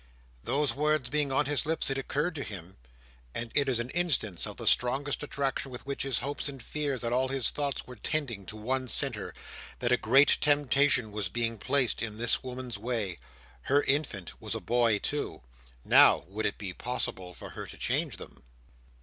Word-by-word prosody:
Those 140 +3 +1
words 150 -3 0
being 150 -2 +1
on 135 - +2
his 145 0 +1
lips, 160 -3 0
it 135 - -1
occurred 150 +6 -1
to 150 - -5
him—and 60 - -9
it 140 -2 +2
is 125 -3 +2
an 120 +2 -3
instance 145 - 0
of - - -8
the - - -5
strong 135 +3 +3
attraction 140 -1 -2
with 125 0 -8
which 140 0 -4
his 135 -4 0
hopes 140 +3 -2
and 135 -1 -9
fears 140 -1 -1
and 115 0 -1
all 130 +1 +2
his 135 -2 +2
thoughts 145 -2 -3
were 125 - -10
tending 125 -10 -2
to 110 - -7
one 130 +4 -1
centre—that 120 +1 -1
a 125 - +5
great 135 +6 +5
temptation 145 -5 +3
was 105 -3 -3
being 115 +1 -2
placed 135 0 +2
in 110 -1 -4
this 115 0 +2
woman's 125 -4 -6
way. 110 -6 -2 0.5
Her 145 +1 +4
infant 135 - -2
was - - -4
a - - -2
boy 120 -3 +2
too. 145 - -4 0.4
Now, - - +6
would 110 +3 -1
it 100 - -4
be 95 -3 -5
possible 95 -6 -3
for - - -9
her - - -7
to - - -10
change - - -1
them? - - -11
125 Hz, 185 wpm, -29 LUFS, 110-140 Hz, 0.5 s, Now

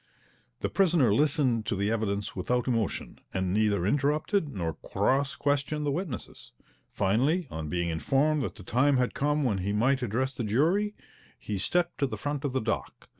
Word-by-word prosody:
The - - 0
prisoner 165 - +3
listened 135 -5 +2
to 110 - 0
the 100 +2 0
evidence 105 -3 -2
without 120 +7 -1
emotion, 115 -5 -2 0.2
and 95 -1 0
neither 105 -3 +2
interrupted 150 - +1
nor 85 - -3
cross 135 - 0
questioned 145 +1 0
the 145 - +1
witnesses. 155 - -5 0.4
Finally, 135 - +1
on 80 -1 -5
being 85 +1 -1
informed 140 - +1
that 100 -8 -3
the 100 - -11
time 130 +7 +2
had 125 -1 +1
come 150 +1 +1
when 105 -7 +1
he 100 +2 -1
might 130 +5 +2
address 125 +3 -1
the 120 - -4
jury, 170 - +1 0.4
he 105 -2 -4
stepped 175 - 0
to 140 - +2
the - - -5
front 145 0 -3
of 140 - -1
the 130 - 0
dock. 110 0 -4
130 Hz, 175 wpm, -28 LUFS, 105-145 Hz, 0.4 s, prisoner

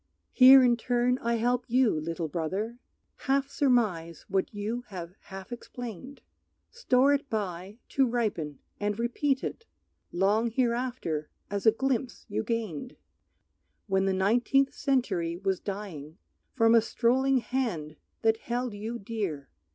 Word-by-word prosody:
Here 260 0 +9
in 240 -1 +4
turn 245 +1 +1
I 235 0 0
help 245 +2 0
you, 250 -1 +3
little 165 +2 -3
brother, 190 +10 -3 0.4
Half 275 0 0
surmise 210 - +1
what 195 -1 0
you 215 +3 -3
have 180 -3 -7
half 195 +2 -9
explained. 245 +1 -8 0.5
Store 280 - +3
it 280 0 -1
by 195 -2 -4
to 270 -1 +2
ripen, 205 - -2 0.2
and 205 0 -1
repeat 260 +4 0
it 455 - -5 0.4
Long 205 +6 +2
hereafter 235 - -1 0.2
as 200 +2 -1
a - - +9
glimpse 255 +1 -2
you 205 - -2
gained, 225 - -3 0.9
When 190 -1 +1
the 195 - +2
nineteenth 245 +8 +2
century 190 -11 0
was 190 0 -1
dying, 185 -7 -6 0.4
From 225 -2 +4
a 230 - +7
strolling 260 +4 +2
hand 225 -13 -2 0.3
that 225 0 +4
held 240 0 -3
you 220 +3 -5
dear 195 -10 -4
225 Hz, 135 wpm, -28 LUFS, 190-250 Hz, 0.9 s, Here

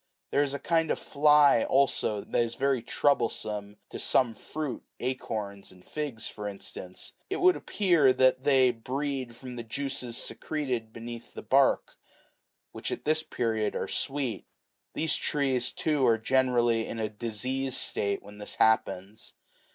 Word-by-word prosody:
There 140 - +3
is 140 -1 0
a - - -1
kind 165 +1 +1
of - - +1
fly 150 -4 +5
also 130 -6 +2
that - - 0
is 115 -1 -1
very 135 -2 +1
troublesome 110 -6 0
to - - -6
some 120 -3 +3
fruit, 145 +3 -5 0.2
acorns 110 -6 -4
and 90 -1 -18
figs 145 -7 -4
for 105 -1 -6
instance: 95 -2 -7 0.2
it 390 - -2
would 365 0 +5
appear 170 -10 +3
that 130 0 +3
they 130 -3 +5
breed 130 +1 -3
from 125 0 -9
the 120 - -4
juices5 125 0 -4
secreted 125 -6 -3
beneath 115 +1 -9
the - - -7
bark, - - +3 0.7
which - - -4
at - - -5
this 155 +1 +3
period 110 -7 -1
are - - -2
sweet. 135 -4 -2 0.5
These 160 0 +1
trees, 130 -4 0
too, 150 -4 0
are 115 -1 +4
generally 120 -2 +2
in - - -5
a 110 -1 -1
diseased 125 +5 -2
state 100 -1 -1
when 105 +1 -12
this 105 - -5
happens. 110 -1 +1
125 Hz, 150 wpm, -28 LUFS, 110-140 Hz, 0.7 s, fly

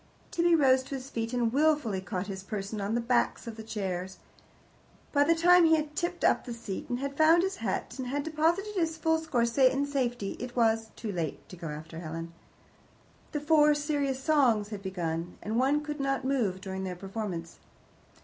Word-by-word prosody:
Tibby 340 0 +3
rose 265 -4 +5
to 275 - -5
his 265 +1 -7
feet, 230 0 -2
and 240 -2 0
wilfully 290 -9 +2
caught 190 -1 -3
his 195 -1 -6
person 200 +1 -4
on 205 +3 -1
the 240 - +1
backs 240 +1 +1
of 230 -2 -6
the 220 - -8
chairs. 190 -4 -4 0.9
By 285 -1 +4
the 335 +3 +3
time 355 +2 +6
he 320 -1 +6
had 300 -1 -3
tipped 350 +2 -2
up - - +3
the 240 -2 -6
seat 200 -4 -6
and 245 - -1
had 275 +2 -4
found 320 +3 +5
his 385 0 -2
hat, - - -3
and 255 - -3
had 285 +3 -1
deposited 330 +7 0
his 330 -4 0
full 320 0 +2
score 300 -7 0
in 270 +1 +4
safety, 245 -7 -2
it 250 0 -6
was 225 -2 +2
"too 220 - -5
late" 165 -6 -4
to - - -9
go 170 -2 -7
after 160 +2 -7
Helen. 165 0 -6 1.0
The 295 - -2
Four 300 -1 +5
Serious 290 -3 -1
Songs 260 -8 +3
had 210 -2 -6
begun, 175 -3 -3
and 220 +3 -1
one 285 +3 +2
could 295 0 -5
not 275 -1 -1
move 225 -9 0
during 190 0 -5
their 185 -1 -4
performance. 190 -3 -5
245 Hz, 195 wpm, -29 LUFS, 195-295 Hz, 1.0 s, time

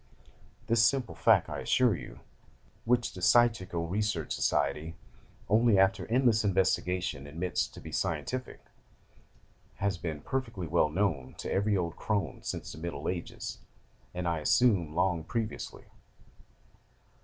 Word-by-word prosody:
This 115 0 +3
simple 120 -5 +2
fact, 80 - +4
I - - -5
assure 125 -5 +3
you, - - -10 0.6
which 120 0 +1
the 90 - -9
Psychical 95 -6 +3
Research 100 -3 -1
Society, 80 +2 0 0.5
only 110 0 +4
after 95 0 +3
endless 120 -2 +3
investigation, 90 -6 0
admits 85 +5 -1
to - - -13
be - - -9
scientific, 130 0 -3 1.1
has 100 -3 -1
been 80 -4 -4
perfectly 115 - -3
well 80 -1 +2
known 80 -7 -1
to - - -5
every 100 +1 +2
old 85 -2 -3
crone 100 - -2
since - - -5
the 80 - -9
Middle 85 +1 -5
Ages, 90 -2 -4 0.5
and, 90 0 -3
I 85 -1 0
assume, 85 -2 +3
long 90 -2 +1
previously. 110 +5 -4
95 Hz, 130 wpm, -30 LUFS, 85-115 Hz, 1.1 s, fact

